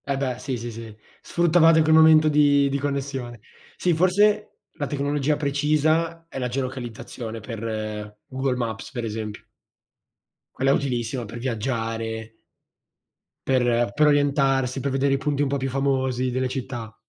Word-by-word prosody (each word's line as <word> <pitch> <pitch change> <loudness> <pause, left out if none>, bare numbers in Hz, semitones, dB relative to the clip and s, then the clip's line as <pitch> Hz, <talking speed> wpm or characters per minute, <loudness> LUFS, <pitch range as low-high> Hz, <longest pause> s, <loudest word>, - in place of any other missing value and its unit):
E 140 -1 -1
beh, 130 -3 -2
sì, 130 -2 -3
sì, 120 +1 -6
sì, 115 -1 -9 0.3
sfruttavate 165 -1 +4
quel 155 0 +3
momento 160 -1 +7
di 145 -2 +4
di 140 +1 -1
connessione. 135 -4 -3 0.4
Sì 180 - +1
forse 205 +5 +3 0.3
la 145 - -3
tecnologia 145 0 0
precisa 155 +3 +1
è 135 - -7
la 125 - -1
geolocalizzazione 120 -3 -5
per, 110 -2 -5
Google 130 0 -1
Maps, 115 -1 -4
per 120 -5 -4
esempio. 110 -1 -5 1.1
Quella 135 +1 +2
è - - +5
utilissima 125 -2 -1
per 110 +3 -8
viaggiare 115 -2 -3 1.1
per 120 -3 +2
per 150 0 +4
orientarsi, 140 -3 +2
per 140 +1 -1
vedere 135 +1 +1
i - - +2
punti 145 0 -1
un - - +1
po' 140 +1 -1
più 135 0 -2
famosi 130 -1 0
delle 130 +1 0
città. 120 -4 -6
135 Hz, 150 wpm, -24 LUFS, 120-145 Hz, 1.1 s, momento